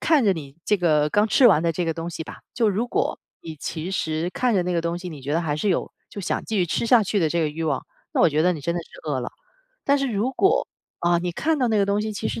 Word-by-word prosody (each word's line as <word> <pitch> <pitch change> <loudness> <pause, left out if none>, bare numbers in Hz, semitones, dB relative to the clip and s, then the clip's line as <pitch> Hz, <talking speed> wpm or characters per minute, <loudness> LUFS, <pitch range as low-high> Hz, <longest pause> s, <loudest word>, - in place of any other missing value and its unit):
看 310 -4 +4
着 200 - +4
你 140 -4 -8
这 210 - +3
个 155 -5 +2
刚 210 +6 +3
吃 245 +3 +5
完 165 -6 +4
的 170 - +1
这 175 +2 -1
个 165 - +1
东 165 +1 -4
西 160 - -5
吧， - - -10
就 230 -3 +2
如 210 +5 0
果 - - -1 0.2
你 160 -2 -8
其 160 +5 -5
实 160 -2 -1
看 250 -2 +1
着 185 - +3
那 180 - -1
个 170 - +2
东 170 +1 -1
西， 180 +1 -7
你 150 -5 -9
觉 140 +2 -3
得 165 - +2
还 150 -3 -1
是 200 +7 -1
有 180 - -1 0.2
就 205 - -6
想 185 - -2
继 220 - -3
续 180 - +2
吃 175 - -1
下 235 -1 +6
去 205 +1 0
的 160 -3 +2
这 170 +1 +1
个 155 - +1
欲 160 +2 -5
望， 140 -5 0 0.3
那 - - +1
我 - - +6
觉 155 +1 +1
得 180 +2 +4
你 160 - -6
真 170 +4 -1
的 175 - -1
是 - - -20 0.2
饿 135 - 0
了。 120 - -4 0.5
但 280 0 +3
是 275 - 0
如 210 +6 0
果， 390 - +2 0.3
啊， 175 0 +3
你 175 0 -2
看 315 - 0
到 250 -3 +2
那 215 -2 +2
个 200 - +3
东 200 +1 +1
西， 215 0 -3
其 205 - -3
实 - - -4
175 Hz, 330 characters per minute, -24 LUFS, 160-215 Hz, 0.5 s, 下